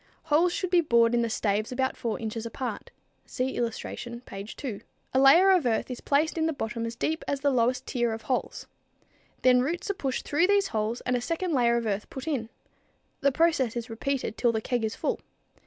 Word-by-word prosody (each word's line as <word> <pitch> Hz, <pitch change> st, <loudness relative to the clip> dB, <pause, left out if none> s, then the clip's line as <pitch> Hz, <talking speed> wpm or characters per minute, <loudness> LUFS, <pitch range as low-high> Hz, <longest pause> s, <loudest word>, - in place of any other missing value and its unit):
Holes 320 Hz, +3 st, +3 dB
should 365 Hz, +1 st, -2 dB
be 355 Hz, -1 st, +5 dB
bored 235 Hz, -6 st, +3 dB
in 240 Hz, -, +3 dB
the 230 Hz, -, 0 dB
staves 215 Hz, 0 st, 0 dB
about 260 Hz, +1 st, 0 dB
4 230 Hz, -2 st, -3 dB
inches 220 Hz, 0 st, -4 dB
apart. 245 Hz, +2 st, -5 dB, 0.4 s
(See 255 Hz, +1 st, -2 dB
illustration, 235 Hz, 0 st, -4 dB
page 200 Hz, -2 st, -8 dB
2.) 225 Hz, -8 st, -5 dB, 0.3 s
A 260 Hz, -, +4 dB
layer 335 Hz, +9 st, +7 dB
of 355 Hz, -9 st, +3 dB
earth 230 Hz, +2 st, 0 dB
is 250 Hz, -, -6 dB
placed 310 Hz, +3 st, +1 dB
in 320 Hz, -, +2 dB
the 320 Hz, -, 0 dB
bottom 230 Hz, -3 st, -3 dB
as 230 Hz, -, -6 dB
deep 320 Hz, +6 st, -2 dB
as 280 Hz, -1 st, -1 dB
the 285 Hz, 0 st, +3 dB
lowest 250 Hz, +1 st, +1 dB
tier 240 Hz, -2 st, 0 dB
of 225 Hz, 0 st, -5 dB
holes. 255 Hz, -, -2 dB, 0.8 s
Then 250 Hz, -1 st, +6 dB
roots 335 Hz, +9 st, -1 dB
are -, -, -2 dB
pushed 270 Hz, -8 st, -3 dB
through 335 Hz, +5 st, +3 dB
these 400 Hz, -1 st, +3 dB
holes 220 Hz, +1 st, -2 dB
and 250 Hz, -, 0 dB
a 245 Hz, -, 0 dB
second 335 Hz, +5 st, -2 dB
layer 235 Hz, -3 st, +3 dB
of 235 Hz, -, -2 dB
earth 205 Hz, -1 st, -2 dB
put 265 Hz, +3 st, -7 dB
in. 250 Hz, -8 st, -2 dB, 0.7 s
The 280 Hz, -, +3 dB
process 275 Hz, -6 st, +2 dB
is 235 Hz, 0 st, -4 dB
repeated 250 Hz, -1 st, -2 dB
till 240 Hz, -, +3 dB
the 220 Hz, -, -1 dB
keg 240 Hz, +1 st, -1 dB
is 220 Hz, -, -2 dB
full. -, -, -1 dB
250 Hz, 215 wpm, -27 LUFS, 230-295 Hz, 0.8 s, layer